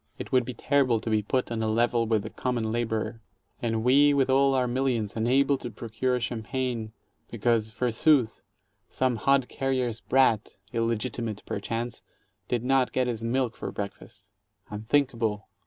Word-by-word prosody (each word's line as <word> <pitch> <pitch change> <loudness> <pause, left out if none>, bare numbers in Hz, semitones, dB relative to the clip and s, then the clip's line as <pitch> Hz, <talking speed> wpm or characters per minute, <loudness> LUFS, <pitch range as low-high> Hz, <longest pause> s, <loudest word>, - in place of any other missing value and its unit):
It - - -7
would 125 -2 +3
be 125 0 -6
terrible 135 -3 +2
to 110 +1 -4
be 110 -1 +3
put 125 +4 -1
on 115 -1 -2
a 110 - 0
level 115 +1 +2
with 110 -2 +1
the - - -7
com 125 -1 -2
mon 110 -2 -1
laborer, 115 -1 -2 0.4
and 115 -2 -1
we 140 +3 +5
with 135 -1 +2
all 135 0 +4
our 130 -1 +2
millions 120 -4 -1
unable 130 +4 +2
to 120 - -5
procure 120 +3 -2
cham 120 -1 -3
pagne, 120 -1 -3 0.4
because, 115 -1 +1
forsooth, 125 +2 +2 0.5
some 130 -2 0
hod 135 +2 +2
carrier's 130 -4 -1
brat 130 -7 +2
— 100 - -28
illegitimate, 115 -1 -2
per - - -3
chance 115 +3 -4 0.2
— 95 -2 -47
did 120 -2 0
not 130 0 +2
get 130 - +2
his 115 -2 -3
milk 120 0 0
for - - -5
breakfast. 100 -1 -8 0.4
Unthinkable! 110 -1 0
120 Hz, 170 wpm, -27 LUFS, 110-130 Hz, 0.5 s, we